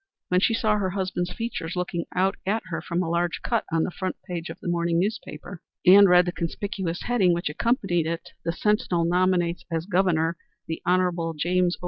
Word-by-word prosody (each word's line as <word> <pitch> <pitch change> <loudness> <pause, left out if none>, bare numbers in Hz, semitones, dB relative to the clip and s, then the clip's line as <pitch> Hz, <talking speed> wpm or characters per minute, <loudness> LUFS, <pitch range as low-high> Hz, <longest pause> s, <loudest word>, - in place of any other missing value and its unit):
When 180 - +3
she 225 +4 +2
saw 215 -2 +2
her 195 -2 0
husband's 185 -2 -2
features 225 -7 -4
looking 175 -1 -2
out 190 +2 +2
at 220 +3 0
her 165 -1 -2
from 175 +2 -1
a - - -3
large 170 0 -1
cut - - 0
on 165 0 +2
the - - -2
front 185 +1 -3
page 175 -2 -5
of - - -8
the - - -8
morning 170 -1 +1
newspaper, 185 -4 -4 0.2
and 195 +2 +8
read 180 0 +6
the 175 - -1
conspicuous 175 0 -3
heading 205 -8 +3
which 170 -3 -2
accompanied 175 - 0
it 165 0 -4
"The 170 - 0
Sentinel 180 -3 +1
nominates 175 -1 +1
as 165 -1 -2
Governor 175 -4 +1 0.3
the 160 - -4
Hon. 175 -2 +1
James 180 +2 +1
O. - - -34
180 Hz, 195 wpm, -25 LUFS, 170-190 Hz, 0.3 s, and